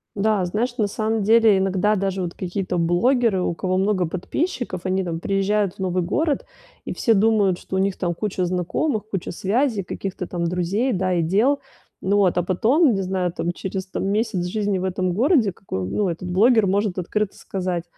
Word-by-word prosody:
Да, 210 -1 +1
знаешь, 235 +7 -2
на 210 -2 +2
самом 220 +2 -1
деле 225 -1 +5
иногда 195 +2 +1
даже 195 -1 -1
вот 175 -1 -3
какие-то 185 0 -3
блогеры, 190 +5 +2
у - - 0
кого 185 +2 -1
много 190 -2 +1
подписчиков, 185 - -3
они 190 +1 0
там 165 -2 -3
приезжают 195 +1 0
в - - -27
новый 185 -1 0
город, 285 - 0 0.4
и - - -3
все 230 - +2
думают, 205 -3 +3
что - - -6
у - - +1
них 195 0 0
там 175 -2 -1
куча 195 -1 -2
знакомых, 185 - -1
куча 190 -4 -3
связей, 215 +4 0
каких-то 185 +1 -5
там 170 -1 -3
друзей, 180 +9 0
да, 185 -1 0
и 175 - +2
дел. 215 - +2 0.4
Ну 200 +2 +1
вот. 190 -3 +3
А 175 - +2
потом, 235 - +3
не 195 - -1
знаю 185 -1 -1
там, 175 0 -2
через 190 +1 -5
там 190 - -3
месяц 205 -3 0
жизни 200 +1 -1
в - - -4
этом 185 -1 -1
городе, 240 - +3
какой 95 - -5
ну, 200 - 0
этот 175 +2 -5
блогер 220 +4 +4
может 200 0 0
открыто 195 +3 -2
сказать 180 -3 -3
195 Hz, 195 wpm, -22 LUFS, 180-215 Hz, 0.4 s, деле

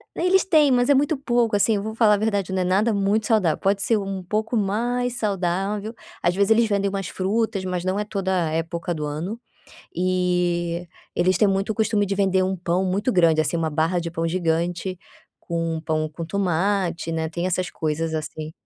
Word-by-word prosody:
Eles 365 +2 +3
têm, 310 -6 +4
mas 245 0 +3
é - - +7
muito 290 +3 +2
pouco, 240 -4 +1
assim. 210 +2 +3
Eu 200 - -3
vou 220 +1 -5
falar 220 -2 +5
a - - -1
verdade, 200 -3 -1
não 190 0 0
é - - 0
nada 200 +5 +2
muito 205 +2 +1
saudável. 195 -9 +2
Pode 200 +1 0
ser 225 - +2
um 195 -2 -4
pouco 215 +5 -1
mais 240 +5 0
saudável, 200 +2 -2 0.3
às 175 +1 +1
vezes, 200 +2 +2
eles 225 +1 +5
vendem 200 -1 +1
umas 195 -1 -3
frutas, 200 +1 -1
mas 180 -1 -3
não 185 +1 0
é - - 0
toda 190 -4 -1
a - - -3
época 165 +2 -2
do 155 -2 -4
ano 165 +10 -4 0.6
e 180 -1 0 0.3
eles 185 +2 +2
têm 210 - +4
muito 195 +2 0
o - - -4
costume 215 -1 +1
de 200 0 -2
vender 190 -1 +2
um 190 +1 -1
pão 180 +1 0
muito 200 +7 0
grande, 165 -5 +4
assim, 155 +2 0
uma 160 -1 0
barra 160 +4 0
de 170 0 -4
pão 165 0 -2
gigante, 175 +2 -1 0.4
com 165 -2 -3
pão 155 -1 -1
com 165 +2 -6
tomate, 180 -2 0
né, 160 0 -1
tem 170 +2 -3
essas 185 0 -1
coisas 160 +1 -2
assim. 155 0 -5
190 Hz, 205 wpm, -23 LUFS, 170-210 Hz, 0.6 s, é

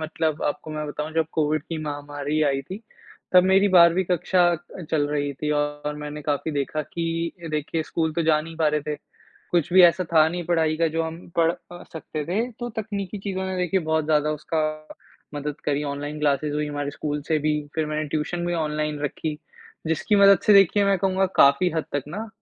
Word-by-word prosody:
मतलब 155 0 -2
आपको 150 +1 -3
मैं 150 0 -4
बताऊँ 150 +2 -5
जब 160 -1 +2
कोविड 155 0 0
की 165 - -5
महामारी 145 +1 -3
आई 135 -2 +1
थी, 190 +9 -8 0.5
तब 180 - +8
मेरी 195 +2 +4
12वीं 175 0 +6
कक्षा 175 0 +3 0.4
चल 150 -2 +2
रही 145 -1 -1
थी 150 +3 -3
और 145 0 -1
मैंने 150 0 -6
काफ़ी 145 +1 -1
देखा 145 +2 -2
कि 165 +1 -3 0.2
देखिए 155 +1 -2
स्कूल 160 0 -2
तो 170 +1 0
जा 155 -1 +3
नहीं 165 +1 -9
पा 160 -1 +2
रहे 150 0 0
थे, 150 +1 -4 0.6
कुछ 175 -1 +1
भी 185 -1 +8
ऐसा 175 +1 +5
था 155 -1 +6
नहीं 175 +1 -4
पढ़ाई 160 -2 +1
का 165 +1 +2
जो 165 +1 -1
हम 165 +1 -7
पढ़ 165 -1 +4
अ, 175 0 -12
सकते 155 -2 -5
थे, 205 +9 -1
तो 240 +2 -6
तकनीकी 205 -2 -4
चीज़ों 190 -1 -4
ने 190 - -3
देखिए 180 +1 +1
बहुत 160 -1 0
ज़्यादा 150 -1 +2
उसका 155 +1 -2 0.7
मदद 145 0 -5
करी, 145 0 0
ऑनलाइन 145 +1 -4
क्लासेज़ 145 0 +1
हुईं, 150 0 -2
हमारे 145 -1 -3
स्कूल 145 0 -3
से 160 -2 +2
भी, 150 0 0
फिर 160 -1 0
मैंने 155 0 -2
ट्यूशन 175 +4 -2
भी 175 - -1
ऑनलाइन 150 -2 -2
रखी। 150 +1 -3 0.5
जिसकी 165 +6 +1
मदद 200 -1 +7
से 210 - +7
देखिए 200 +1 +5
मैं 195 -1 +2
कहूँगा 190 +1 +1
काफ़ी 140 +6 +5
हद 160 - -1
तक 145 - -1
ना, 215 +7 -5
155 Hz, 205 wpm, -24 LUFS, 150-175 Hz, 0.7 s, तब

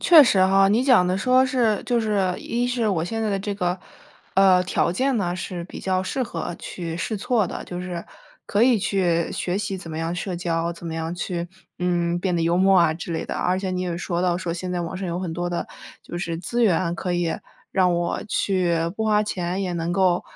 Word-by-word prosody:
确 325 -4 +9
实 190 -7 +4
哈， 195 +1 +5
你 225 +5 +3
讲 235 -10 +5
的 185 - +1
说 255 +5 +4
是 240 -5 +1
就 240 -2 +2
是， 200 -4 +1
一 240 +1 -1
是 245 -3 0
我 170 -5 0
现 225 +5 -3
在 215 - 0
的 195 - 0
这 200 +1 -3
个， 180 -1 -1 0.6
呃， 190 -1 +6
条 170 -2 +1
件 260 +7 +1
呢 180 -4 0
是 180 -1 -5
比 - - -9
较 185 -1 0
适 255 +7 -2
合 175 -6 -4
去 165 -2 -5
试 215 +5 -2
错 215 -1 +1
的， - - -6
就 180 0 -6
是 175 -2 -5 0.4
可 205 +3 +2
以 245 -2 +5
去， 180 -4 +1
学 180 +1 -2
习 195 -1 -2
怎 170 -3 -9
么 155 - -5
样 165 +1 -2
社 180 0 -3
交、 170 -1 -1
怎 170 0 -10
么 165 - -4
样 165 +1 -3
去， 175 -1 -3 0.3
嗯， 175 -1 0
变 180 -1 -1
得 165 - +1
幽 170 +1 +2
默 190 0 +5
啊 170 -2 +4
之 170 0 -6
类 160 - -2
的， - - -5
而 185 +1 0
且 190 -1 -3
你 180 0 -2
也 175 -2 -2
说 175 -1 -2
到 180 -1 +2
说 180 -2 -3
现 180 +1 -4
在 175 -1 -1
网 170 +2 -5
上 190 0 -4
有 170 +1 -2
很 180 -3 -3
多 175 +1 -2
的， 175 - -3 0.4
就 175 - -6
是 170 -2 -3
资 235 +8 -1
源 175 -4 +2
可 180 0 -3
以 175 -2 0 0.4
让 180 -2 +3
我 170 0 -1
去 185 -5 +1 0.2
不 220 - -1
花 210 -1 +3
钱， 185 -2 -2
也 180 -2 -2
能 170 0 -2
够， 180 -1 +2
180 Hz, 255 characters per minute, -23 LUFS, 175-200 Hz, 0.6 s, 确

